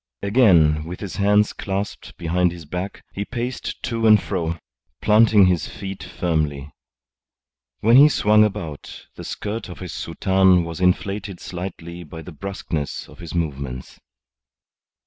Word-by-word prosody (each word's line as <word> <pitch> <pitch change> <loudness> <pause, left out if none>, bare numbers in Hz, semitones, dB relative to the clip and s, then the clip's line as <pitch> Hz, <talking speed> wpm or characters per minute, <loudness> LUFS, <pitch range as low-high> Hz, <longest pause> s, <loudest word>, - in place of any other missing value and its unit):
Again, 85 -9 +4
with 90 +2 -7
his 95 -4 -6
hands 105 +1 +3
clasped 100 +1 -5
behind 90 +1 +1
his 85 -2 -10
back, 90 +6 -5
he 100 - -3
paced 120 +3 -5
to 115 -2 0
and 110 -1 +7
fro, 85 -1 -3 0.4
planting 105 -2 +5
his 90 -4 +1
feet 95 -1 -7
firmly. 75 -5 -2 1.1
When 115 +4 +6
he 145 +2 +9
swung 105 -5 +4
about, 95 -9 -4
the - - -9
skirt 105 0 -5
of 90 - -8
his 90 -3 -7
soutane 95 -2 +2
was 85 +1 -6
inflated 100 +1 0
slightly 85 -1 -7
by 80 +1 -9
the 90 - -9
brusqueness 80 -3 -5
of - - -16
his 85 -1 -8
movements. 70 -6 -4
90 Hz, 140 wpm, -22 LUFS, 85-105 Hz, 1.1 s, he